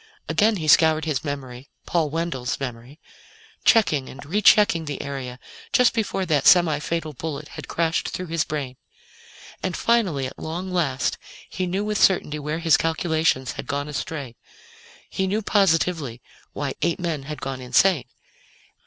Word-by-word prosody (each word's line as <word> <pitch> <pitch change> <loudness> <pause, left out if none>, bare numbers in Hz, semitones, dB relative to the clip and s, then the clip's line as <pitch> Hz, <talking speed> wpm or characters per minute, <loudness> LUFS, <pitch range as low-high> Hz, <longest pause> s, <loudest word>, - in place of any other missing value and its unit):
Again 215 +1 +3
he 160 -5 -4
scoured 160 0 +5
his 150 -5 -1
memory 135 -3 -6 0.2
Paul 165 -4 0
Wendell's 145 -6 -3
memory 125 +2 -7 0.6
checking 155 - +3
and 140 +2 -10
rechecking 200 -1 +4
the 145 -2 -5
area 135 -3 -5 0.4
just 250 -1 +5
before 205 -4 -1
that 150 -5 +2
semi 170 -5 +6
fatal 155 0 -3
bullet 145 +1 -6
had - - -9
crashed 165 -1 0
through 185 - -5
his 165 -1 0
brain. 140 -5 -5 0.8
And 185 -2 -2
finally, 195 - +1
at 130 - -8
long 175 +4 -5
last, 140 -7 0 0.3
he 185 -1 -3
knew 190 +3 -1
with 210 -1 -1
certainty 150 -5 +3
where 150 +2 -3
his 165 -2 +4
calculations 160 -5 0
had - - -7
gone 145 0 -2
astray. 145 -4 -5 0.7
He 190 - -2
knew 210 +3 -1
positively 165 - +1 0.3
why 140 -2 -3
eight 170 +1 0
men 165 -5 -2
had 150 - -5
gone 135 -1 -5
insane. 145 +4 +3
160 Hz, 155 wpm, -23 LUFS, 140-180 Hz, 0.8 s, semi